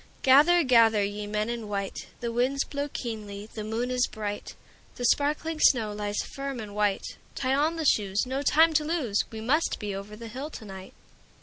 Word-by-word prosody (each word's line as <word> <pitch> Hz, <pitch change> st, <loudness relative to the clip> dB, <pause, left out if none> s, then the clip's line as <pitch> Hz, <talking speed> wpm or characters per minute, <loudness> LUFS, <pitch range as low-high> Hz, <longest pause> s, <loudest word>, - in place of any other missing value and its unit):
Gather, 300 Hz, +6 st, +6 dB
gather, 230 Hz, -5 st, +5 dB
ye 205 Hz, +1 st, -4 dB
men 210 Hz, +1 st, -1 dB
in 235 Hz, -2 st, -4 dB
white; 200 Hz, -1 st, -4 dB
The 235 Hz, -1 st, -2 dB
winds 255 Hz, +4 st, +1 dB
blow 285 Hz, 0 st, -4 dB
keenly, 210 Hz, -5 st, -6 dB
the 215 Hz, -, -5 dB
moon 230 Hz, +4 st, -2 dB
is 250 Hz, -1 st, +2 dB
bright, 205 Hz, -1 st, -5 dB, 0.4 s
The 245 Hz, -, -3 dB
sparkling 305 Hz, +5 st, +1 dB
snow 225 Hz, -8 st, +4 dB
lies 205 Hz, 0 st, -3 dB, 0.2 s
firm 275 Hz, -2 st, -4 dB
and 210 Hz, -2 st, -7 dB
white; 205 Hz, -1 st, 0 dB, 0.3 s
Tie 260 Hz, 0 st, 0 dB
on 300 Hz, +4 st, +2 dB
the 320 Hz, -1 st, -3 dB
shoes, 205 Hz, -5 st, +2 dB
no 265 Hz, +2 st, -2 dB
time 320 Hz, +3 st, +4 dB
to 305 Hz, 0 st, +3 dB
lose, 300 Hz, -10 st, 0 dB
We 220 Hz, -1 st, -7 dB
must 290 Hz, +9 st, +1 dB
be 205 Hz, -1 st, -4 dB
over 200 Hz, +2 st, -7 dB
the 230 Hz, +1 st, -9 dB
hill 260 Hz, +7 st, -6 dB
to 230 Hz, -, -9 dB
night. 190 Hz, -1 st, -10 dB
235 Hz, 195 wpm, -27 LUFS, 210-275 Hz, 0.4 s, Gather